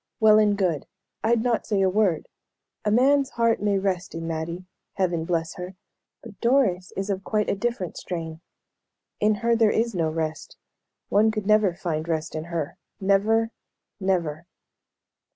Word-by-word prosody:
"Well 215 -1 +7
and 210 -1 +3
good. 175 -7 0 0.4
I'd 225 0 +2
not 240 -2 0
say 200 -3 +2
a - - +4
word. 190 -4 +1 0.6
A 210 - +1
man's 270 +5 +4
heart 230 -2 +2
may 205 -1 +2
rest 190 -3 -2
in 165 0 -4
Mattie 165 +2 -4 0.3
Heaven 175 -4 0
bless 165 -1 -1
her! 180 +1 -7 0.5
But 205 -5 -12
Doris 230 -8 +2
is 195 +1 -1
of 195 0 -3
quite 210 0 0
a - - 0
different 200 -4 -3
strain. 165 -2 -5 0.8
In 210 0 +3
her 235 0 +4
there 225 -2 +4
is 230 +2 +1
no 165 -4 0
rest. 155 0 -4 0.5
One 210 +2 +4
could 215 -2 -3
never 215 -4 +3
find 160 -3 -3
rest 160 -2 -2
in 155 0 -4
her. 170 -4 -4 0.2
Never 215 +4 +2 0.5
never." 170 -4 -1
195 Hz, 160 wpm, -25 LUFS, 170-215 Hz, 0.8 s, Well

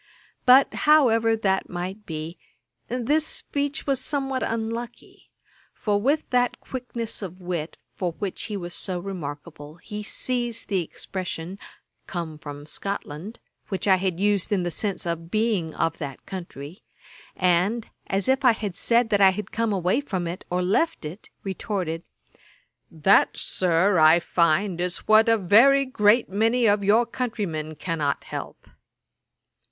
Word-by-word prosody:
But 260 +2 +7 0.2
however 230 -7 +5
that 195 -3 0
might 185 +4 -5
be, 160 +1 -6 0.5
this 255 +6 +1
speech 285 -1 -2
was 270 -2 +1
somewhat 270 -2 -1
unlucky; 230 +1 -5 0.4
for 205 -2 0
with 285 +7 +1
that 245 -1 +1
quickness 240 -4 -4
of 185 -2 -7
wit 175 -3 -4 0.2
for 175 -3 -3
which 195 +1 -4
he 210 -2 -4
was 175 -2 -6
so 185 -2 -2
remarkable, 155 -4 -7
he 210 +5 -7
seized 240 +2 -2
the 195 -3 +1
expression 180 +1 -6 0.5
'come 165 -4 -5
from 145 -1 -8
Scotland,' 195 +3 -5 0.3
which 190 0 -3
I 195 - +7
used 190 +2 0
in 195 -3 +1
the 175 - -2
sense 200 +4 -2
of 170 -1 -3
being 210 -6 0
of 165 0 -1
that 140 -4 -7
country; 170 -2 -8 0.5
and, 185 +6 +1 0.2
as 195 0 -1
if 265 +1 +2
I 250 -3 +6
had 205 -5 -5
said 235 +3 +2
that 205 -1 +3
I 195 - +8
had 210 +3 -4
come 230 -1 0
away 190 +6 +1
from 185 -11 -3
it, 175 +2 -6
or 180 +1 0
left 215 - +1
it, 165 +8 -8
retorted, 190 -4 -3 0.9
'That, 165 +4 +3
Sir, 180 +1 +2
I 155 +2 +7
find, 170 +2 +1
is 180 0 -3
what 220 +1 +6
a 225 - +5
very 240 +9 +5
great 230 -2 +3
many 225 +5 +2
of 205 -1 +3
your 215 +4 +4
countrymen 200 -11 -3
cannot 150 -4 -2
help.' - - -7
195 Hz, 145 wpm, -25 LUFS, 175-230 Hz, 0.9 s, I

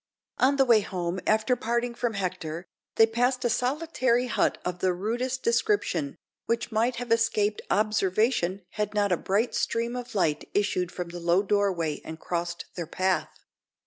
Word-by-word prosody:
On 270 +2 +4
the 270 -1 +4
way 235 -3 +6
home, 180 -2 -3
after 220 +3 +3
parting 235 0 -1
from 235 -2 -2
Hector, 180 -3 -3 0.3
they 225 - +7
passed 245 +3 0
a 240 - +2
solitary 255 -1 +1
hut 240 - +1
of 180 0 -3
the 185 0 +2
rudest 240 +7 -2
description, 235 - +1 0.3
which 235 +1 -1
might 230 +3 +1
have 240 0 -5
escaped 215 -2 +2
observation 205 -2 +1
had 210 0 -3
not 205 -2 +2
a - - +5
bright 205 +8 0
stream 235 +1 -1
of 245 -2 -6
light 155 -6 0
issued 185 -3 +1
from 175 -1 -5
the 175 +1 -7
low 170 +3 +2
doorway 190 -7 0
and 160 0 -8
crossed 170 0 -3
their 170 -3 -5
path. 185 -2 0
210 Hz, 165 wpm, -27 LUFS, 180-240 Hz, 0.3 s, they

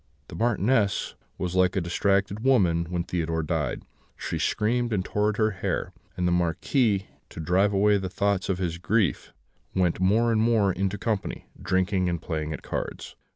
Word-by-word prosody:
The - - -8
Marchioness 110 -2 +1 0.2
was 90 -1 -3
like 95 0 +3
a - - +2
distracted 100 +3 0
woman 95 -10 +3
when 85 -1 -1
Theodore 80 -2 -2
died; 75 - -2 0.3
she - - -4
screamed 120 +2 0
and 100 -3 0
tore 105 +1 +1
her 110 -1 +2
hair, 95 -2 -3 0.2
and 90 - +1
the - - +2
Marquis, 95 - +1 0.2
to - - -10
drive 90 +5 +2
away 100 +1 +3
the 95 -1 -4
thoughts 100 0 0
of 95 - +1
his 85 -2 -3
grief, 100 -1 0 0.4
went 90 -3 +1
more 110 +6 +3
and 110 -1 +2
more 110 -4 +3
into 95 +2 -1
company, 110 -3 -3 0.2
drinking 95 +1 +1
and 85 -1 -2
playing 80 -2 -3
at 75 - -6
cards. - - -5
95 Hz, 170 wpm, -26 LUFS, 90-105 Hz, 0.4 s, like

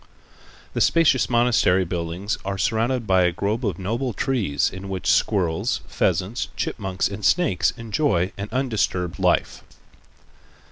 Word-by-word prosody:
The - - -1
spacious 160 -6 +3
monastery 120 -6 +3
buildings 85 +4 -3
are 100 0 -3
surrounded 115 +4 0
by 95 -2 +3
a 90 - +2
grove 105 +8 -2
of 100 -7 -1
noble 115 +6 -2
trees, 105 - 0
in 95 +1 -8
which 95 -2 -5
squirrels, 90 -6 +1
pheasants, 105 +6 -1
chipmunks 95 -2 -2
and 100 +1 -7
snakes 165 - +2
enjoy 110 - 0
an 100 +2 -6
undisturbed 110 -9 -1
life. - - +1
100 Hz, 130 wpm, -23 LUFS, 95-120 Hz, -, spacious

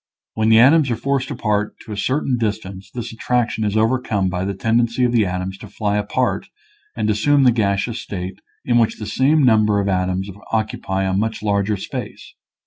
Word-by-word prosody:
When 110 0 +1
the 110 - +6
atoms 140 +4 +6
are 120 - +1
forced 135 +3 -1
apart 105 -1 -1
to 110 - -9
a - - -3
certain 130 +3 0
distance 100 -3 -4
this 120 -2 -6
attraction 120 -1 -1
is 105 0 0
overcome 110 -4 +1
by 90 0 -2
the 100 0 -3
tendency 115 +4 +1
of 120 - +3
the 115 -5 +2
atoms 90 +1 -4
to 105 - -10
fly 105 0 -2
apart 115 +5 -1 0.5
and - - -1
assume 140 +7 +3
the 125 - +6
gas 100 -4 +1
eous 120 -1 -5
state 95 -2 -6 0.2
in 120 -1 +3
which 115 -1 +1
the 105 - -6
same 140 +8 +2
number 110 -4 +4
of 100 - -1
atoms 95 0 0 0.2
occupy 110 -3 -1
a 95 0 0
much 110 +2 -1
larger 100 0 +1
space. - - -7
110 Hz, 195 wpm, -20 LUFS, 100-120 Hz, 0.5 s, the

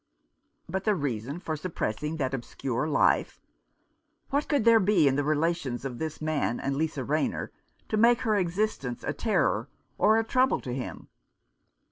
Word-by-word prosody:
But 190 0 -3
the 210 0 +2
reason 140 - -3
for 160 -3 -3
suppressing 150 -2 -3
that 135 -3 -1
obscure 130 +1 -3
life? 150 - +2 0.9
What 285 +2 +1
could 285 -7 +2
there 230 -1 +7
be 185 -6 +4
in 135 - +3
the 145 - +1
relations 150 -4 0
of 125 -3 -5
this 160 -1 -4
man 155 -6 -1
and 135 0 -2
Lisa 150 -2 -1
Rayner 155 +4 -1 0.4
to 215 - -1
make 235 +2 +5
her 220 -3 +1
existence 180 - -1
a - - -2
terror - - 0 0.3
or 215 +1 +5
a 225 - +2
trouble 255 +3 +2
to 125 - -5
him 130 0 -6
155 Hz, 160 wpm, -28 LUFS, 135-210 Hz, 0.9 s, there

